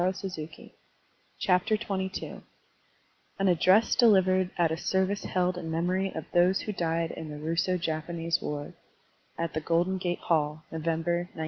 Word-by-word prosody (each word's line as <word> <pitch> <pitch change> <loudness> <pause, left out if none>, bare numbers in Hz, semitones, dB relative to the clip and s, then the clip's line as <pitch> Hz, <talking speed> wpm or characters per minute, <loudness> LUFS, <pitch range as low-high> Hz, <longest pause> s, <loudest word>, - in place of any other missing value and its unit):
Digitized 180 -4 -4 0.8
by 180 -1 +6
Google 195 -3 -2 1.0
AN 195 - +1
ADDRESS 185 +5 +4
DELIVERED 190 -6 +4
AT 170 -2 +3
A - - +1
SERVICE 190 +3 0
HELD 180 -1 0
IN 165 - -6
MEMORY 180 +4 0
OF 160 - -4
THOSE 180 +2 +4
WHO 210 - -4
DIED 165 -2 -1
IN 160 - -7
THE 150 - -6
RUSSO 165 +4 0
JAPANESE 165 +1 -2
WAR 145 -1 -4 0.6
(At 165 -2 -2
the 155 - -2
Golden 175 +4 +1
Gate 175 -1 -1
Hall, 155 -1 0
November, 165 +1 0 0.2
1905.) - - -11
175 Hz, 145 wpm, -28 LUFS, 160-190 Hz, 1.0 s, by